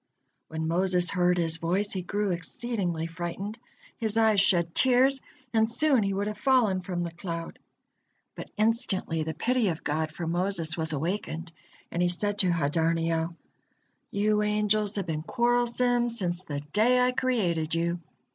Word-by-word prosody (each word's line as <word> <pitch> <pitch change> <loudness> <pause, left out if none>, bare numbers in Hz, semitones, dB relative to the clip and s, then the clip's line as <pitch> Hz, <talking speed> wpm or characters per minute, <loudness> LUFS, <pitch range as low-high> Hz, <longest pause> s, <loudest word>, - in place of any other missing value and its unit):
When 160 0 -3
Moses 180 +1 +2
heard 180 -1 +2
his 165 -1 +1
voice, 185 +5 0
he 190 - -2
grew 205 +2 -1
exceedingly 180 -2 -2
frightened, 175 +6 -5 0.4
his 220 -1 0
eyes 220 -3 +5
shed 170 -4 +2
tears, 260 +1 +3 0.3
and 220 0 +3
soon 265 +1 +3
he 200 -1 0
would 195 +1 -1
have 210 0 -5
fallen 235 -8 +3
from 180 -2 -3
the 170 - -4
cloud. 170 -1 -6 0.7
But - - -9
instantly 210 -7 0
the 160 0 -3
pity 245 +6 +1
of 165 -4 -2
God 155 +1 -1
for 170 +2 -5
Moses 175 -1 -1
was 160 -1 -1
awakened, 165 +1 -3 0.4
and 175 - -1
He 175 - +3
said 205 +3 -2
to 185 - +6
Hadarniel: 165 +1 0 0.7
"You 210 +1 +1
angels 210 0 +1
have 200 -3 -1
been 155 -3 -3
quarrelsome 240 +3 +1
since 180 -6 -3
the 145 -4 -4
day 245 +4 +4
I 250 0 +3
created 180 -12 0
you. 170 +1 0
185 Hz, 155 wpm, -27 LUFS, 165-215 Hz, 0.7 s, to